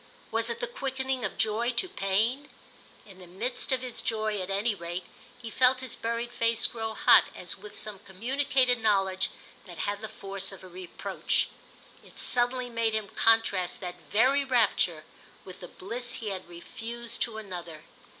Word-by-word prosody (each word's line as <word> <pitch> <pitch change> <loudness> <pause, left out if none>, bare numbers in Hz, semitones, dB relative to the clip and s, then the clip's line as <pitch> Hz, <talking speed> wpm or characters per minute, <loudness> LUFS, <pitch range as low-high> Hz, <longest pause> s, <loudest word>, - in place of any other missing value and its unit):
Was - - +2
it 465 0 -3
the - - +1
quickening 265 - -2
of - - -2
joy 225 +3 +1
to 240 +10 +1
pain? 225 - 0 0.6
In 195 -2 -14
the 180 - -12
midst 220 +10 -1
of 260 -1 +2
his 250 -2 -5
joy 215 -2 -1
at 185 - -5
any 205 +4 +1
rate 175 -1 -5 0.4
he 230 -2 -7
felt 255 +2 +4
his 260 -3 -5
buried 235 +1 -2
face 230 -1 +2
grow 225 -1 -2
hot - - +7
as 180 - -2
with 210 +1 -7
some 215 -2 -2
communicated 250 +5 +1
knowledge 195 -3 +2 0.4
that 175 -2 -10
had 205 +3 -2
the 220 - -5
force 195 -2 -3
of 195 - -11
a - - -9
reproach. 180 -1 -1 0.5
It - - -17
suddenly 245 +1 +2
made 230 -2 0
him 215 -2 -2
contrast 225 -5 +3
that 180 -1 -6
very 265 +6 +4
rapture 215 - +2 0.4
with 185 -1 -10
the 180 - -8
bliss 240 +7 -4
he 220 -4 -4
had 185 -3 -5
refused 230 +7 -5
to 230 -2 0
another. 175 -7 -7
220 Hz, 170 wpm, -29 LUFS, 190-245 Hz, 0.6 s, hot